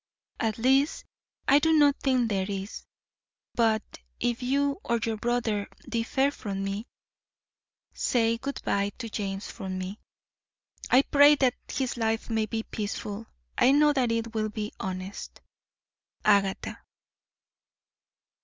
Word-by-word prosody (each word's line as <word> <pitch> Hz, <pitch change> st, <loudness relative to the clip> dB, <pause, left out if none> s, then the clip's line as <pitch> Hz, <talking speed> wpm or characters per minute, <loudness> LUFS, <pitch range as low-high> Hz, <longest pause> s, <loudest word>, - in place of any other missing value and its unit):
At 220 Hz, -2 st, 0 dB
least 265 Hz, +5 st, +2 dB, 0.4 s
I 280 Hz, -, +7 dB
do 320 Hz, +2 st, +2 dB
not 290 Hz, -2 st, +5 dB
think 255 Hz, -3 st, +2 dB
there 195 Hz, -2 st, -1 dB
is; 195 Hz, +1 st, -5 dB, 0.7 s
but 220 Hz, -2 st, +2 dB, 0.4 s
if 240 Hz, +1 st, -1 dB
you 280 Hz, +6 st, 0 dB
or 235 Hz, -, +1 dB
your 225 Hz, -1 st, -1 dB
brother 230 Hz, -3 st, -1 dB, 0.2 s
differ 265 Hz, +4 st, +1 dB
from 195 Hz, -7 st, -5 dB
me 200 Hz, +4 st, -3 dB, 1.1 s
Say 230 Hz, -1 st, +1 dB
good 275 Hz, +3 st, -5 dB
bye 200 Hz, 0 st, 0 dB
to 230 Hz, -, -5 dB
James 195 Hz, -2 st, -4 dB
from 185 Hz, -1 st, -5 dB
me. 185 Hz, +3 st, -5 dB, 0.9 s
I 260 Hz, +2 st, +6 dB
pray 290 Hz, +1 st, +6 dB
that 260 Hz, -3 st, +2 dB, 0.2 s
his 255 Hz, -2 st, -2 dB
life 225 Hz, 0 st, -1 dB
may 220 Hz, -1 st, +1 dB
be 225 Hz, +1 st, -3 dB
peaceful. 210 Hz, 0 st, -5 dB, 0.3 s
I 260 Hz, +2 st, +6 dB
know 295 Hz, +1 st, +5 dB
that 255 Hz, -4 st, +1 dB
it 230 Hz, 0 st, -2 dB
will 215 Hz, -1 st, -1 dB
be 210 Hz, 0 st, -5 dB
honest. 185 Hz, +1 st, -6 dB, 0.9 s
AGATHA. 200 Hz, -2 st, +2 dB
225 Hz, 130 wpm, -27 LUFS, 205-260 Hz, 1.1 s, I